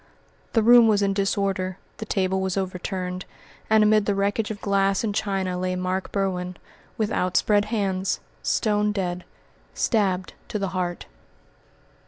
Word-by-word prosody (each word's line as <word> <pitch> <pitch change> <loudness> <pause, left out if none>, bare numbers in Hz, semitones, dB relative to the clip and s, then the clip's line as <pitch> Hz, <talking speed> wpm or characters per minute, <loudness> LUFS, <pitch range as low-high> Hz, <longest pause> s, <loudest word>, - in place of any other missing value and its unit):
The 225 - +3
room 240 0 +8
was 205 -2 +3
in 195 0 +2
disorder, 195 -2 -1 0.2
the 220 - -6
table 190 -1 0
was 190 0 -1
overturned, 185 -1 -3 0.4
and 220 0 +5
amid 210 -1 +4
the 205 - +2
wreckage 205 +2 0
of 215 -2 -5
glass 195 0 +1
and 215 -2 -1
china 190 -3 -1
lay 185 0 -1
Mark 185 +1 -2
Berwin, 180 -2 -2 0.4
with 215 -2 0
outspread 205 +3 +2
hands 195 -4 -1 0.2
stone 210 -2 +1
dead 180 -3 -2 0.5
stabbed 190 -5 0
to - - -3
the 195 -2 -2
heart. 180 -1 -3
195 Hz, 145 wpm, -24 LUFS, 185-210 Hz, 0.5 s, room